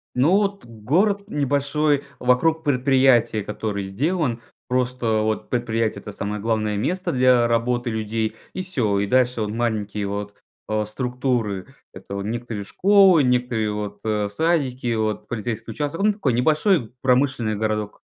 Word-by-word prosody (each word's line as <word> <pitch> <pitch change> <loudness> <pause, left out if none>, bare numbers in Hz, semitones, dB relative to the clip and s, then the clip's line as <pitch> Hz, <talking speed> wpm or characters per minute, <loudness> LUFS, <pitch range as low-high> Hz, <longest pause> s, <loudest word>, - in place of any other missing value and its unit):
Ну 140 +8 +3
вот 200 -4 -1
город 165 - 0
небольшой 145 -1 0 0.2
вокруг 155 +6 +2
предприятия, 130 -6 +3
который 105 -1 -3
сделан 125 - -1 0.3
просто. 125 -3 0
Вот 110 0 -2
предприятие- 115 -2 -1
это 105 - -8
самое 105 +1 -4
главное 110 -1 -1
место 180 - -1
для 125 -2 +4
работы 120 +1 0
людей 110 0 -2 0.2
и 185 - -3
всё, 125 - 0
и 100 - 0
дальше 125 0 +2
вот 105 - -1
маленькие 105 -3 -2
вот, 100 +1 -5 0.3
а, 110 0 0
структуры: 125 -3 -2 0.3
это 95 +1 -10
вот 100 - -3
некоторые 115 -1 -4
школы, 190 - +5
некое 125 -4 +1
вот, 105 -1 -5
э, 105 -1 0
садики, 130 -2 0
вот 110 -1 -2
полицейский 115 0 -4
участок. 145 - -3
Ну 210 0 +4
такой 150 - -1
небольшой 155 - +2
промышленный 125 -4 +1
городок. 105 -1 -2
120 Hz, 140 wpm, -22 LUFS, 110-140 Hz, 0.3 s, школы